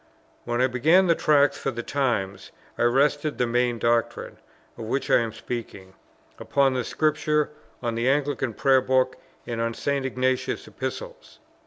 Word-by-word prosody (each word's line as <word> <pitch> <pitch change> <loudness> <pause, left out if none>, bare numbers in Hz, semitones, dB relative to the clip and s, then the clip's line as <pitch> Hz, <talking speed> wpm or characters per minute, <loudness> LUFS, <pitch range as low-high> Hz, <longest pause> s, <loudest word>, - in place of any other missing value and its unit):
When 120 +1 -1
I - - +5
began 155 +9 +4
the 170 - +4
Tracts 145 -3 +3
for - - -2
the 120 -2 -5
Times 100 -9 -2 0.3
I - - -5
rested 145 +4 +2
the 125 - +1
main 120 0 +1
doctrine, 115 0 -1 0.4
of 115 - -7
which 135 +5 -2
I - - +6
am 115 -1 -2
speaking, 110 -4 -7 0.5
upon 135 -3 +1
Scripture, 150 +1 0 0.3
on 120 -1 -1
the 115 +3 0
Anglican 135 -4 0
Prayer 135 -2 +4
Book, 130 0 +1 0.3
and 115 -1 -3
on 115 0 -1
St. 140 -1 -1
Ignatius's 130 0 -1
Epistles. - - -7
130 Hz, 155 wpm, -25 LUFS, 120-145 Hz, 0.5 s, I